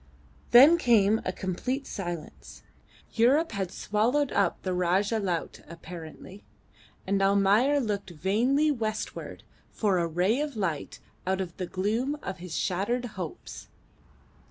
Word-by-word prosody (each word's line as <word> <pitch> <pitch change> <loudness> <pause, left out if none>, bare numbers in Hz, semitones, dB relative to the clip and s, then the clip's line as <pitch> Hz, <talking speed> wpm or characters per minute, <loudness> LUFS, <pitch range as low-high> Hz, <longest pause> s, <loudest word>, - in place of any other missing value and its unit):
Then 285 +8 +8
came 220 -5 +3
a 185 - 0
complete 250 +10 -3
silence. 175 -4 -7 0.5
Europe 270 +8 +3
had 195 -4 -3
swallowed 245 +7 0
up 195 -4 +1
the 185 - -1
Rajah 190 +5 +1
Laut 180 -5 -3
apparently, 170 +3 -10 0.6
and 195 +1 0
Almayer 200 +8 +3
looked 205 -6 -3
vainly 230 - +1
westward 220 -5 -4 0.3
for 200 -4 0
a 170 - 0
ray 180 - +1
of 295 -3 -4
light 170 -9 -3 0.3
out 190 0 0
of 180 -3 -4
the 185 - -4
gloom 225 +11 -1
of 190 - -5
his 175 -2 -6
shattered 205 +7 -1
hopes. 180 -5 -7
200 Hz, 130 wpm, -27 LUFS, 185-240 Hz, 0.6 s, Then